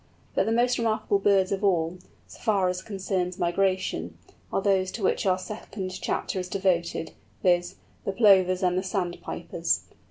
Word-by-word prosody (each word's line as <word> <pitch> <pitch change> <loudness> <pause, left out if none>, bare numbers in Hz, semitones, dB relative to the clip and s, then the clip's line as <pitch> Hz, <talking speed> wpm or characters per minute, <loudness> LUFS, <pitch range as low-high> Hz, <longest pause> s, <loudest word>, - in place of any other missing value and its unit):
But - - +1
the - - +1
most 245 +2 +2
remarkable 215 -3 +1
birds 195 -2 +3
of 195 +1 -1
all, 175 -2 +1 0.3
so - - -14
far 200 -5 +2
as 180 0 -2
concerns 185 -2 -2
migration, 175 - 0 0.3
are - - +1
those 190 -1 +2
to 225 - -5
which 190 - +1
our 185 -1 +3
second 190 0 -6
chapter 190 - -2
is 180 0 -5
devoted, 180 -4 0 0.3
viz., 175 0 +2 0.3
the - - -1
Plovers 190 -3 +4
and 180 -1 +2
the 185 - +1
Sandpipers. 185 -2 -2
190 Hz, 160 wpm, -26 LUFS, 180-200 Hz, 0.3 s, Plovers